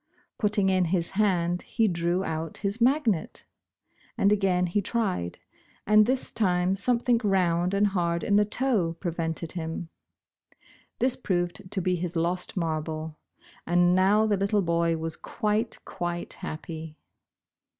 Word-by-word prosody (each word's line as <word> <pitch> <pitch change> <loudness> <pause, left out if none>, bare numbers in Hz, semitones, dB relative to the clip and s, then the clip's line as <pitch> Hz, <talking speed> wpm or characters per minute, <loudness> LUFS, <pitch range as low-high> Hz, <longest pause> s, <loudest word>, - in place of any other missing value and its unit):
Putting 205 -2 +2
in 185 -1 +3
his 170 0 0
hand, 180 -4 +1
he 225 -2 0
drew 175 0 0
out 160 -2 -4
his 200 +4 -1
magnet. 240 - +1 0.7
Again 195 -4 +3
he 180 +4 0
tried, 190 - -2 0.5
and 215 +1 +5
this 260 +1 0
time 185 -3 +1
something 240 +3 +2
round 180 -2 +2
and 200 +1 +3
hard 170 -4 0
in 205 - +2
the 210 - +5
toe 210 -7 0
pre 175 - -2
vented 165 0 -3
him. 165 -1 -5 1.1
This 255 +1 +1
proved 185 -3 -2
to 190 - -1
be 180 0 +1
his 175 0 -4
lost 175 +3 -1
marble 155 -2 -3 0.2
— - - -26
and 175 +1 +4
now 195 +4 +4
the 210 -2 +1
little 200 +1 +1
boy 170 -1 +1
was 160 0 -3
quite, 215 +1 -2
quite 175 0 -4
happy. 160 -1 -7
180 Hz, 140 wpm, -27 LUFS, 170-210 Hz, 1.1 s, and